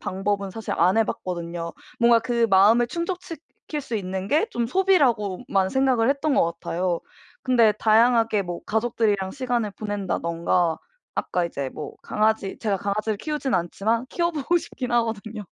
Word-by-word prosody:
방법은 200 +1 -2
사실 225 +2 -5
안 180 +5 +4
해봤거든요. 170 -5 -3 0.3
뭔가 235 -1 +5
그 235 0 +1
마음을 210 +5 +5
충족시킬 335 -1 -6
수 245 -5 -4
있는 190 -1 -4
게 310 - +3
좀 235 - -1
소비라고만 240 - +2
생각을 260 -3 +2
했던 280 +1 +1
것 - - +4 0.2
같아요. 175 0 -1 0.4
근데 235 -4 +4
다양하게 225 0 +3
뭐 175 -2 -6
가족들이랑 220 -4 0
시간을 245 -6 -1
보낸다든가 175 -5 -1 0.4
아까 180 - 0
이제 140 -5 -3
뭐 - - -7
강아지 215 -2 0
제가 210 -3 0
강아지를 205 +2 -2
키우진 295 0 -3
않지만 215 +8 0
키워 340 +3 0
보고 320 +2 0
싶긴 255 -6 -6
하거든요. 225 -2 -1
220 Hz, 345 characters per minute, -24 LUFS, 190-250 Hz, 0.4 s, 뭔가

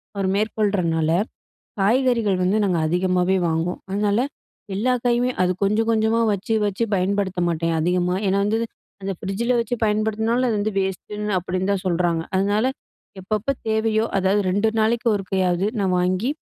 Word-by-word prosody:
அவரு 195 -1 0
மேற்கொள்றனால, 195 -7 0 0.7
காய்கறிகள் 230 -2 +2
வந்து 195 +4 +2
நாங்க 180 -4 +1
அதிகமாவே 180 +2 +1
வாங்குவோம். 165 +2 -1
அதனால, 205 +2 +1 0.5
எல்லா 245 +6 +1
காயுமே 245 +1 +2
அது 180 - +2
கொஞ்சம் 220 +3 +1
கொஞ்சமாக 220 +1 +2
வச்சு 210 +3 -2
வச்சு 205 +3 -1
பயன்படுத்த 190 0 0
மாட்டேன், 165 0 0
அதிகமா. 180 +2 +1
ஏன்னா 195 +1 +2
வந்து 220 +2 +1 0.4
அந்த 195 0 -2
ஃப்ரிட்ஜில 235 +6 -1
வச்சு 235 +1 -2
பயன்படுத்தினாலும், 220 +3 +1
அது 215 - 0
வந்து 215 +1 -1
வேஸ்ட்டு 190 +2 -4
ன்னு 210 -2 0
அப்பிடீன்னு 185 +2 -2
தான் 195 -1 -2
சொல்றாங்க. 170 -2 +1
அதனால, 205 +5 +2 0.5
எப்பப்ப 215 +6 -2 0.2
தேவையோ 220 0 +1
அதாவது 195 +2 +2
2 205 +4 +2
நாளைக்கு 230 +2 +1
ஒருக்கையாவது 190 -1 0
நான் 190 -2 +1
வாங்கி 185 +8 0
200 Hz, 145 wpm, -22 LUFS, 185-220 Hz, 0.7 s, காய்கறிகள்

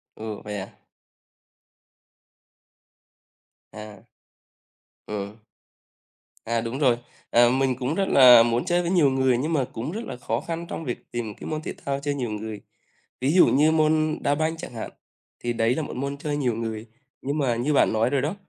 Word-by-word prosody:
Ừ, 110 -1 -6
vậy 105 -1 -5
à? 95 - -11 2.9
À. 105 -2 -11 1.0
Ừm. 105 0 -5 1.1
À, 115 0 0
đúng 115 +4 -4
rồi, 125 -5 +3 0.3
ờ, 120 0 +5
mình 130 0 +1
cũng 135 +5 -1
rất 195 - +1
là 125 -3 +8
muốn 120 +1 0
chơi 175 0 +2
với 170 - -2
nhiều 165 -7 +4
người 130 -2 +2
nhưng 155 +6 -2
mà 140 -4 +1
cũng 125 +7 -4
rất 215 +5 -4
là 125 - -7
khó 115 -1 -2
khăn 170 0 -5
trong - - -5
việc 120 - -6
tìm 115 -3 -4
cái - - -8
môn 155 -1 -3
thể - - -5
thao 140 0 -1
chơi 145 +1 -2
nhiều 125 -4 -3
người. 105 0 -6 0.6
Ví 135 +3 +2
dụ 180 - +6
như 150 +3 +4
môn 155 0 +2
đá 145 - +1
banh 160 +2 -1
chẳng 145 - -8
hạn, 115 - -6 0.5
thì 120 0 -2
đấy 115 +1 +1
là 160 - -1
một - - -7
môn 140 +2 -3
chơi 145 0 -3
nhiều 125 -5 0
người, 110 0 -5 0.3
nhưng 140 +3 -2
mà 130 -5 +1
như 125 +6 0
bạn 140 - +3
nói 110 +3 +2
rồi 140 -1 +1
đó, 155 +8 -2
130 Hz, 190 wpm, -24 LUFS, 115-150 Hz, 2.9 s, là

